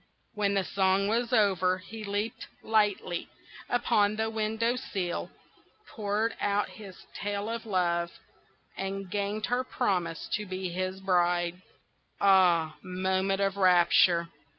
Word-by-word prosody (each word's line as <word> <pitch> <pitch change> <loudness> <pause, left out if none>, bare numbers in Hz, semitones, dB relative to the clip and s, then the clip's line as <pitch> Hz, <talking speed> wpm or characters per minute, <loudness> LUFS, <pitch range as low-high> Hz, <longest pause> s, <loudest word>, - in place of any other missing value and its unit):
When 205 -2 0
the 195 - +2
song 190 +1 +1
was 235 +3 0
over 190 -5 +3
he 215 +4 -9
leaped 205 +2 -3 0.2
lightly 205 -5 0 0.4
upon 215 -4 +2
the 220 0 -1
window 220 +2 0
sill, 190 -8 -3 0.6
poured 215 0 -1
out 205 0 +1
his 200 -4 -12
tale 205 0 -3
of 230 0 -5
love, 170 -3 +1 0.7
and 195 -1 -4
gained 205 +1 -1
her 245 +1 0
promise 180 -10 -1
to 210 -1 -1
be 185 0 -4
his 185 +2 -3
bride. 175 -1 +1 0.6
Ah, 175 -5 +4
moment 190 +1 -1
of 195 0 0
rapture! 175 -2 +4
195 Hz, 125 wpm, -29 LUFS, 185-215 Hz, 0.7 s, Ah